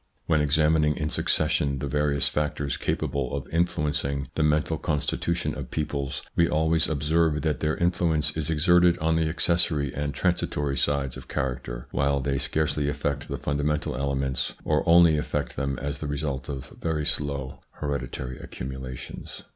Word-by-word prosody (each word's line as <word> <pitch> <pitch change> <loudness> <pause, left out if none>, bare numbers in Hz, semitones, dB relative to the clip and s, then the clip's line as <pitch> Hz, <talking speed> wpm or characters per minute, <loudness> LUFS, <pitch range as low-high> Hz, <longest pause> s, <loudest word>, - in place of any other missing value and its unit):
When 80 -2 +3
examining 75 +1 +3
in 75 - -1
succession 75 -4 +1
the 65 - -3
various 70 -1 +1
factors 75 -1 -1
capable 70 -2 -1
of 70 - -4
influencing 75 -5 0
the - - -1
mental 75 +1 +2
constitution 80 +3 -1
of - - -6
peoples, 70 -3 -2
we 85 0 +4
always 80 +1 +2
observe 80 0 +1
that 75 -5 0
their 75 0 0
influence 80 -3 +1
is 80 0 -3
exerted 85 +2 +4
on 80 +1 +1
the 80 -1 +2
accessory 80 -4 +1
and 75 0 -2
transitory 75 -4 0
sides 70 0 0
of - - -11
character, 60 -2 -3
while 70 0 +1
they 70 0 0
scarcely 75 +2 0
affect 70 -1 -2
the - - -3
fundamental 75 0 -1
elements, 70 -1 -1
or - - +2
only 85 -2 +7
affect - - -2
them 70 0 -1
as 70 0 -4
the 75 - -4
result 70 -2 -3
of 70 -2 -6
very 80 -2 -1
slow 70 -3 -1
hereditary 70 -3 -4
accumulations. 65 -1 -7
75 Hz, 155 wpm, -26 LUFS, 70-80 Hz, -, only